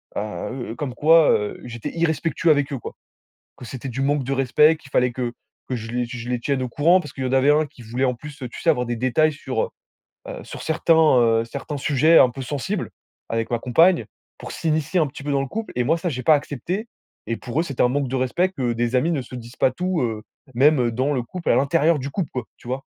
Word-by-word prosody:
heu 115 +4 -4
heu, - - -6
comme 135 -2 -4
quoi, 160 +1 +5
heu, 105 0 -1
j'étais 120 -2 -6
irrespectueux 165 0 +1
avec 145 -1 +1
eux 135 - -3
quoi. - - -8 0.6
Que 125 - -10
c'était 130 +3 -6
du 125 +2 -4
manque 140 0 +1
de 135 - -1
respect, 135 +4 +4
qu'il 135 - -17
fallait 125 -2 +2
que 120 -1 -3 0.4
que 130 - -1
je 115 -1 -6
les 125 0 -1
que 125 - -7
je 120 +1 -7
les 125 -1 -1
tienne 135 +2 -1
au 125 - -4
courant 165 +9 +4
parce 150 - -8
qu'il 135 - -5
y - - +1
en - - -3
avait 135 +2 +5
1 150 +1 +2
qui 140 -3 -17
voulait 120 +4 -1
en 125 -1 0
plus 150 +3 -11
heu, 125 - -5
tu - - -9
sais? - - +2
Avoir 125 - -1
des 120 - -2
détails 130 +6 +2
sur, 145 - -3
heu - - -3 0.6
heu, - - -7
sur - - -9
certains, 160 +1 +2
heu, 120 -8 +4
certains 145 +5 -6
sujets 155 +4 +4
un 130 - +6
peu 135 - -7
sensibles 130 0 -3 0.4
avec 115 0 -2
ma 120 - 0
compagne 165 +9 +3 0.3
pour - - -8
s'initier 160 +2 0
un 155 - +2
petit 140 0 -10
peu 145 - -2
dans 140 - +2
le 135 - -3
couple 225 +11 -5
et 125 - +2
moi, 160 +6 +2
ça, 175 +1 -2
j'ai 130 -4 -4
pas 160 - +6
accepté 170 - -4 0.4
et 115 - -2
pour 125 +2 -6
eux, - - -1
c'était 140 -7 -1
un - - +5
manque 140 +1 0
de 130 - -2
respect 130 +9 +1
que 130 -10 -2
des 120 +1 -1
amis 160 +7 +1
ne 150 -5 0
se 125 - -13
disent 120 0 -10
pas 130 - +3
tout 180 +4 -1
heu, 110 -3 -2 0.3
même, 145 +3 +5
heu, 120 -1 +1
dans 130 +5 0
le 125 -3 -1
couple, 175 +9 -5
à - - +4
l'intérieur 145 +4 +3
du 135 +2 -4
couple 185 -2 -2
quoi, 125 - -3
tu - - -15
vois. 130 +2 -3
135 Hz, 265 wpm, -22 LUFS, 125-155 Hz, 0.6 s, un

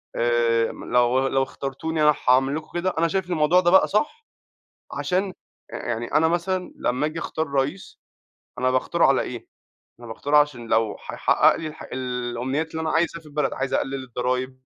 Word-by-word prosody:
آآ، 115 -1 +2
لو 125 +2 +1
لو 135 0 +1
اخترتوني 140 +4 -3
أنا 150 -1 +5
هأعمل 135 +2 +4
لكم 155 0 -5
كده، 185 +1 -1
أنا 170 - +3
شايف 185 +1 -2
الموضوع 165 +1 +3
ده 175 -1 +3
بقى 190 - +6
صح، 375 - -1 0.7
عشان 190 +1 -1 0.4
يعني 120 0 -4
أنا 160 +2 +4
مثلًا 180 +2 -1
لما 125 +4 0
آجي 155 +2 -4
أختار 160 -1 -3
رئيس 140 +7 -3 0.6
أنا 130 0 +2
باختاره 130 0 +1
على - - +3
ايه؟ - - -7 0.5
أنا 120 - -10
باختاره 145 +6 0
عشان 145 -6 +2
لو 110 -1 +1
هيحقق - - +3
لي 165 - -5
الح 155 - -8
الأمنيات 125 +4 -3
اللي 160 - -4
أنا 160 - -1
عايزها 170 0 0
في 160 - -19
البلد، 150 -2 -1
عايز 135 0 -2
أقلل 135 -1 -1
الضرايب، 130 +1 -3
140 Hz, 170 wpm, -24 LUFS, 125-165 Hz, 0.7 s, بقى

